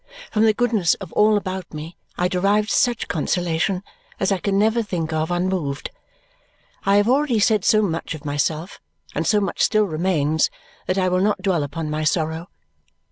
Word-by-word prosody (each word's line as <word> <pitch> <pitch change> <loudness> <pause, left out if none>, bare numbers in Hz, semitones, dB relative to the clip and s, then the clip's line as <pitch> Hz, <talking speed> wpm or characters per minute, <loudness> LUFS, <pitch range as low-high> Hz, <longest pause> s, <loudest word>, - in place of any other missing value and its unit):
From 215 0 +3
the 220 - +4
goodness 220 -9 +2
of - - -10
all 210 0 +4
about 185 -4 -5
me 155 +3 -7 0.2
I 180 - +2
derived 200 +4 +1
such 240 -2 +1
consolation 175 +2 -1 0.4
as - - +1
I 195 - +1
can 195 0 0
never 220 +3 +3
think 170 -7 -3
of 155 +1 -1
unmoved. 175 -5 -2 1.0
I 200 - +5
have 205 +1 +4
already 265 -1 +2
said 210 -1 +3
so 215 0 +4
much 165 -3 -2
of 150 - -12
myself, 150 +4 -2 0.3
and - - -1
so 210 - +4
much 200 - -2
still 215 0 +3
remains, 160 -3 +1 0.4
that 185 - 0
I 185 -1 +2
will 185 0 +1
not 200 -1 0
dwell 185 -5 +1
upon 150 +2 -4
my 155 +1 -2
sorrow. 160 +2 -1
185 Hz, 180 wpm, -22 LUFS, 160-210 Hz, 1.0 s, I